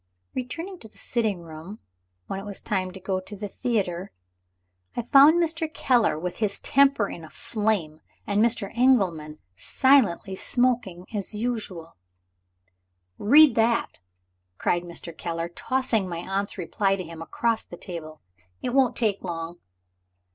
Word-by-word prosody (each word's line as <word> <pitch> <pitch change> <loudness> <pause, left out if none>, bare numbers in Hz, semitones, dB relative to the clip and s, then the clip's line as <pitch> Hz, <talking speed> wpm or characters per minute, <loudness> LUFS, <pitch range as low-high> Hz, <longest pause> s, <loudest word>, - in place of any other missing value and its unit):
Returning 330 +9 -5
to 220 - -12
the - - -25
sitting 220 -7 -1
room, 165 +5 -9 0.5
when 195 - -4
it - - -8
was 205 -1 -2
time 190 -4 -1
to 190 - -10
go 190 0 -2
to 185 +2 -9
the 205 +1 -5
theater, 195 -5 -2 0.8
I 240 - -2
found 280 +6 +7
Mr. 325 -2 0
Keller 240 - +2
with 180 +2 -4
his 205 -3 0
temper 275 -6 +3
in 170 - -8
a 160 - -10
flame, 200 -9 -2 0.2
and 205 +1 +1
Mr. 230 -4 0
Engelman 185 -12 +2 0.2
silently 230 - +3
smoking 230 -5 +1
as 205 0 -3
usual. 210 -8 -4 1.2
"Read 285 +5 +7
that!" 230 +1 +1 0.6
cried 175 - +1
Mr. 170 -1 -6
Keller, 165 0 -4
tossing 230 0 -1
my 170 - -4
aunt's 195 +1 -2
reply 195 +2 0
to 185 - -5
him 165 -1 -9
across 230 +6 -1
the 175 - -11
table. 160 -4 -8 0.4
"It 245 - -2
won't 255 -3 +3
take 215 -4 0
long." 170 -1 -5
200 Hz, 145 wpm, -25 LUFS, 175-240 Hz, 1.2 s, found